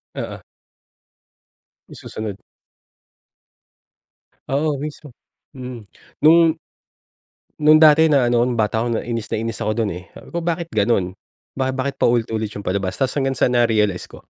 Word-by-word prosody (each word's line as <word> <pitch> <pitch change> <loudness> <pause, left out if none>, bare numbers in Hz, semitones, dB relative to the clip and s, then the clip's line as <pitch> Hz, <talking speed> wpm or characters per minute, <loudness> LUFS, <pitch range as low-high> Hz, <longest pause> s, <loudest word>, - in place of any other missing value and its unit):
Oo. - - -6 1.5
Yung - - -13
susunod. 110 -2 -6 2.1
Oo, 145 +1 0
mismo. 150 -1 -7 0.4
Hmm, 125 -4 -8 0.4
nung 165 +1 +6 1.0
nung 155 +1 +6
dati 155 +1 +7
na 140 -6 +3
ano 120 -1 +3
ako, - - +1
nung 120 -2 -2
bata 105 0 +1
ako, - - -1 0.2
inis 115 -3 -4
na - - 0
inis 115 -1 -4
ako 110 - -1
dun, 105 - -2
eh. 90 +1 -9
Sabi - - -13
ko, 170 - -2
"Bakit 170 0 -2
ganun? 100 -3 0 0.4
Ba 130 0 0
bakit 135 +1 -3
paulit 120 -1 +2
ulit 110 -1 -2
yung 100 - -6
palabas?" 95 0 -2
Tapos 135 -2 -1
hanggang 135 -1 0
sa 120 - +2
na-realize 110 -6 +1
ko, - - -14
120 Hz, 150 wpm, -20 LUFS, 110-150 Hz, 2.1 s, dati